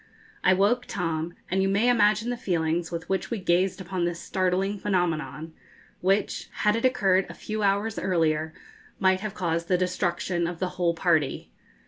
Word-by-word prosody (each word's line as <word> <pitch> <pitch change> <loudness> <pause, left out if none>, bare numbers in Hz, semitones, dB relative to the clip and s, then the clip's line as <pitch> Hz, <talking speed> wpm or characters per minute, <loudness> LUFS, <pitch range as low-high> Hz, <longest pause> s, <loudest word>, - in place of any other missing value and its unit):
I 185 - +5
woke 225 +6 +2
Tom, 165 -2 -3 0.2
and 190 +1 +2
you 195 - +2
may 200 +5 +2
imagine 220 0 +3
the - - -1
feelings 170 -6 -1
with 165 -1 -5
which 190 0 -1
we 235 - -2
gazed 185 0 +1
upon 185 -1 -3
this 170 -1 -1
startling 190 +3 0
phenomenon, 160 -5 -1 0.5
which, 195 +3 0
had 210 0 +4
it 230 - 0
occurred 195 -7 +3
a - - -8
few 215 0 -4
hours 205 +2 +1
earlier, 160 -4 +1 0.5
might 190 -1 +3
have 210 0 -5
caused 170 -2 -1
the 180 - +3
destruction 175 -1 -1
of 175 0 -5
the 185 +1 -2
whole 175 -2 0
party. 165 -5 0
185 Hz, 170 wpm, -26 LUFS, 170-200 Hz, 0.5 s, I